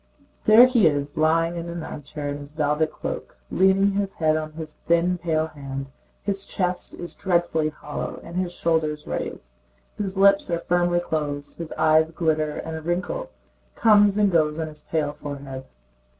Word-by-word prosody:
There 220 +3 +9
he 240 -8 +4
is 145 -1 -1
lying 165 +2 +2
back 170 -1 -4
in 170 - -7
an 170 -1 -5
armchair 145 0 -6
in 145 0 -4
his 145 0 -10
velvet 155 0 +1
cloak, - - -6
leaning 190 +1 +4
his 195 0 -2
head 155 -1 +2
on 155 0 -3
his 155 -1 -7
thin 170 +2 +2
pale 160 -2 0
hand. 135 -3 -7 0.3
His 195 -1 -1
chest 180 -1 -1
is 175 - -7
dreadfully 170 -4 +1
hollow 150 -1 -6
and 170 - -9
his 180 -1 -1
shoulders 160 -3 0
raised. - - -5 0.5
His 195 -2 -2
lips 195 0 +5
are 170 - +1
firmly 175 0 +1
closed, 145 -3 -3
his 165 -2 -6
eyes 155 0 +4
glitter, 155 -2 0
and 160 0 -5
a 160 - -5
wrinkle 180 - -2 0.5
comes 205 -2 +5
and 205 -2 +3
goes 155 -2 +2
on 160 -1 -3
his 150 -1 -12
pale 150 -2 -1
forehead. 140 -3 -7
160 Hz, 175 wpm, -24 LUFS, 150-180 Hz, 0.5 s, There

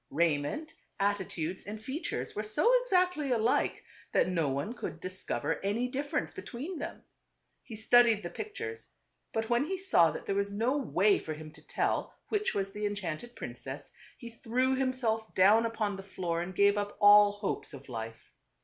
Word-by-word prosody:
Raiment, 165 - 0 0.3
atti 200 -1 +1
tudes 170 +3 -4
and 215 +1 -5
features 265 +9 -4
were 210 - -1
so 215 - +2
exactly 360 - +2
alike, 235 -1 +1 0.3
that - - +4
no 165 -5 +1
one 140 - -2
could 190 -8 -6
discover 185 +2 -3
any 215 +5 0
difference 285 +4 -2
between 300 +8 -6
them. - - -6 0.6
He 225 - -9
studied 225 0 +5
the 175 - -5
pictures; 440 +1 -6 0.4
but 225 +1 -2
when 240 +2 +4
he 380 +4 -2
saw 270 - +4
that 155 - -6
there - - -1
was 200 0 0
no 230 +7 +1
way 210 -7 +3
for 155 - -5
him 155 0 -9
to - - -16
tell - - -1
which 420 -1 0
was 195 -1 -1
the 210 +1 -2
enchanted 205 +3 -5
princess, - - -7 0.3
he 235 -2 -9
threw 250 +3 0
himself 255 -4 -1
down 210 +5 +6
upon 215 -3 -2
the - - -6
floor 175 -3 -3
and 180 +1 -5
gave 200 +1 +4
up 205 0 -4
all 205 0 +8
hopes 205 -1 -3
of 140 -2 -11
life. 115 -2 -7
210 Hz, 175 wpm, -31 LUFS, 185-255 Hz, 0.6 s, all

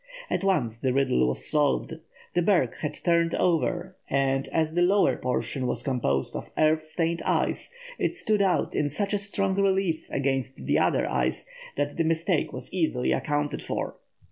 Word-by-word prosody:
At - - 0
once 130 - +1
the 130 0 0
riddle 125 - +2
was 65 - -1
solved. 150 +2 +1 0.3
The 175 - +2
berg 170 - +2
had 150 -1 -3
turned 170 -1 +2
over, 175 +1 0
and, 135 0 +1
as 160 -1 0
the 175 - +1
lower 195 +3 +4
portion 130 +1 -2
was 120 0 -1
composed 90 - 0
of - - -6
earth 155 0 +3
stained 165 +1 -1
ice, - - 0 0.3
it - - 0
stood 215 - +1
out 190 -2 +1
in 145 - 0
such 200 +6 -2
strong 200 -1 -1
relief 190 -4 +1
against 135 -1 -2
the - - +2
other - - +2
ice - - -1 0.3
that - - -2
the 165 - +2
mistake 165 +2 0
was - - -7
easily 160 -9 0
accounted 145 -1 -1
for. - - -3
160 Hz, 170 wpm, -26 LUFS, 135-180 Hz, 0.3 s, lower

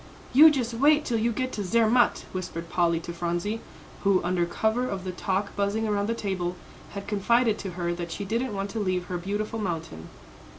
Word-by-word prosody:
"You 305 +5 +10
just 250 -6 -1
wait 295 +5 +4
till 230 -3 0
you 235 +2 +1
get 255 +3 -2
to 205 - -3
Zermatt," 230 +5 +3
whispered 170 -2 -5
Polly 170 -2 +2
to 170 - -6
Phronsie, 175 +6 -2 0.4
who, 195 -2 +4
under 175 0 +1
cover 220 +7 0
of 190 -2 -4
the 185 - -3
talk 195 +2 -2
buzzing 205 +2 0
around 205 -1 0
the 230 - 0
table, 185 -5 -2 0.4
had 200 -1 -6
confided 220 +2 +2
to 195 - -4
her 175 -1 -1
that 170 -1 -5
she 200 +4 -4
didn't 230 +2 -1
want 195 +1 -3
to 225 - -3
leave 185 -3 0
her 180 -1 -4
beautiful 205 +4 -3
mountain. 165 - -4
200 Hz, 200 wpm, -26 LUFS, 180-225 Hz, 0.4 s, You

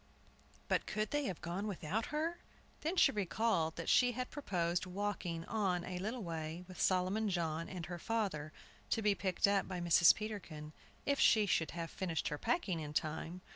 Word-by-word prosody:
But - - +1
could 215 0 -1
they 290 -1 +1
have 185 -8 -3
gone 180 +5 -2
without 200 +2 -2
her? 320 +3 -2 0.4
Then 325 +4 -1
she - - +6
recalled 195 -4 +1
that 165 - -5
she 245 -1 +5
had 255 +2 -4
proposed 180 - -1
walking 180 -3 -3
on 190 -5 0
a 180 -1 -4
little 220 +5 -3
way 165 0 -4
with 185 - -7
Solomon 190 +4 +2
John 165 -3 -1
and 180 -3 -5
her 175 -1 -6
father, 190 -9 -1 0.4
to 225 - +1
be 205 -1 +4
picked 185 0 +1
up 200 -1 +2
by 185 -2 -4
Mrs. 170 0 +6
Peterkin, 170 -8 -6 0.3
if 280 -1 +1
she 215 -2 +6
should 165 -5 +1
have 165 -1 -4
finished 170 -4 -2
her 150 - -4
packing 195 - 0
in 150 -1 -5
time. 160 +3 -2
185 Hz, 180 wpm, -36 LUFS, 165-215 Hz, 0.4 s, she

